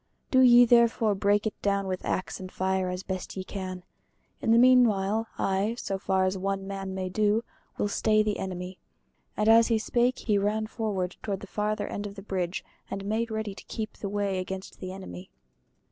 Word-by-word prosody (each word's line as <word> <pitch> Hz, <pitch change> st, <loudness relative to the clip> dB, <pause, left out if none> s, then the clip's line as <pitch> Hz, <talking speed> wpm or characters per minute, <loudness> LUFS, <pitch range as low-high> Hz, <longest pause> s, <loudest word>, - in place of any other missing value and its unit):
Do 260 Hz, -, +5 dB
ye 245 Hz, -1 st, +8 dB
therefore 235 Hz, -2 st, +4 dB
break 205 Hz, +1 st, +2 dB
it 220 Hz, -, -1 dB
down 200 Hz, -1 st, +1 dB
with 185 Hz, -1 st, -3 dB
axe 185 Hz, -, -2 dB
and 185 Hz, -1 st, -8 dB
fire 190 Hz, 0 st, 0 dB
as 180 Hz, +1 st, -4 dB
best 190 Hz, 0 st, -5 dB
ye 190 Hz, -, -3 dB
can. 185 Hz, -2 st, -6 dB, 0.6 s
In -, -, -1 dB
the 230 Hz, -, +6 dB
meanwhile 225 Hz, -4 st, +4 dB
I, 195 Hz, +4 st, 0 dB
so 195 Hz, -5 st, -3 dB
far 190 Hz, -1 st, +1 dB
as 185 Hz, 0 st, -1 dB
one 195 Hz, 0 st, -2 dB
man 195 Hz, -1 st, -5 dB
may 185 Hz, -1 st, -2 dB
do, 210 Hz, +4 st, +1 dB, 0.3 s
will -, -, +1 dB
stay 215 Hz, +1 st, +2 dB
the 210 Hz, -1 st, -1 dB
enemy." 180 Hz, 0 st, -5 dB, 0.6 s
And 210 Hz, -, +1 dB
as 225 Hz, +1 st, +7 dB
he 230 Hz, -, +2 dB
spake 240 Hz, +3 st, +1 dB
he 210 Hz, -3 st, +1 dB
ran 210 Hz, +2 st, 0 dB
forward 205 Hz, -5 st, -3 dB
to 200 Hz, -, -2 dB
the 200 Hz, -, -9 dB
farther 210 Hz, +2 st, -2 dB
end 205 Hz, 0 st, -4 dB
of 200 Hz, -, -10 dB
the 195 Hz, -, -9 dB
bridge 185 Hz, -3 st, -3 dB, 0.2 s
and 195 Hz, 0 st, -5 dB
made 225 Hz, +3 st, -1 dB
ready 220 Hz, -2 st, -3 dB
to -, -, -12 dB
keep 215 Hz, -1 st, -5 dB
the 200 Hz, -, -6 dB
way 200 Hz, -2 st, -1 dB
against 190 Hz, +1 st, -6 dB
the 185 Hz, -, -6 dB
enemy. 95 Hz, -, -9 dB
200 Hz, 200 wpm, -28 LUFS, 190-220 Hz, 0.6 s, ye